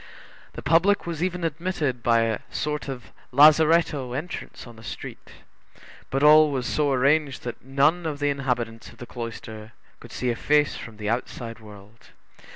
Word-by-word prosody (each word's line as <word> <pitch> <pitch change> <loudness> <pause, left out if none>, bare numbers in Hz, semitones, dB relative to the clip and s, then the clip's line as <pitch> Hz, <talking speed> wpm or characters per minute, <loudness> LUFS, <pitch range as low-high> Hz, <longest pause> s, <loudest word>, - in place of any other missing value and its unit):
The - - -8
public 170 +7 +3
was 165 -2 -5
even 180 -1 -2
admitted 160 -5 -2
by 115 -1 +3
a 115 -2 0
sort 150 0 -3
of 130 -4 -7 0.2
lazaretto 150 -2 +4
entrance 150 +7 -6
on 120 -2 -12
the 110 - -15
street. - - -8 0.8
But 135 +1 -1
all 155 +1 +7
was 130 -3 -2
so 145 +1 0
arranged, 140 +2 +1
that 120 - -7
none 150 +6 +1
of 150 -2 -3
the 145 0 0
inhabitants 125 -5 -3
of - - -17
the 125 - -9
cloister 115 -2 -8 0.3
could - - -13
see 125 -1 -1
a - - -2
face 150 +4 +2
from 110 -2 -9
the 105 -1 -5
outside 115 -1 -4
world. 105 +1 -15
135 Hz, 165 wpm, -24 LUFS, 115-155 Hz, 0.8 s, all